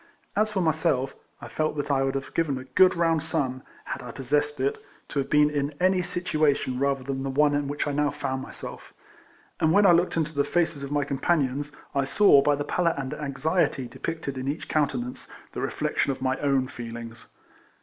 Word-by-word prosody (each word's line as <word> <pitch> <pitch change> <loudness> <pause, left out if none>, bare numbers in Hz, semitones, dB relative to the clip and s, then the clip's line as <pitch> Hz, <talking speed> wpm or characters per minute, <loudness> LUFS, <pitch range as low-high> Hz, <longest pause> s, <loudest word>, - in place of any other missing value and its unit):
As 215 +1 +2
for 195 -3 0
myself, 155 -5 +1 0.3
I - - -7
felt 155 -1 -2
that 145 0 -1
I 135 -1 +2
would 135 0 0
have 135 0 -4
given 155 -5 0
a 130 - -6
good 180 +9 +4
round 165 -2 +2
sum 140 -5 -2 0.2
(had - - -4
I 125 - -8
possessed 145 +4 -1
it) 135 +2 -1 0.3
to 145 - -1
have 135 - -2
been 150 0 +4
in 145 0 -2
any 185 0 +3
situation 155 -7 0
rather 140 -1 +1
than 135 0 -3
the 135 - -2
one 145 +2 +3
in 145 -1 0
which 145 +1 -2
I 145 - -1
now 145 +1 +1
found 135 -2 -3
myself; - - -9 0.6
and 160 - +3
when 205 +4 +5
I 190 - +8
looked 175 0 +3
into 160 -1 0
the 140 -1 +2
faces 160 0 0
of 140 0 -6
my 145 -1 +1
companions, 140 0 0 0.2
I 140 -1 +1
saw, 145 -1 +6
by 145 +1 +3
the 145 - -3
pallor 170 +2 +1
and 135 0 -3
anxiety 150 -1 0
depicted 140 +1 -5
in 130 - -4
each 145 +3 -3
countenance, 130 -5 -1 0.2
the - - -5
reflection - - 0
of 135 - -5
my 130 0 0
own 135 -2 +1
feelings. 115 -1 -8
145 Hz, 205 wpm, -26 LUFS, 135-160 Hz, 0.6 s, I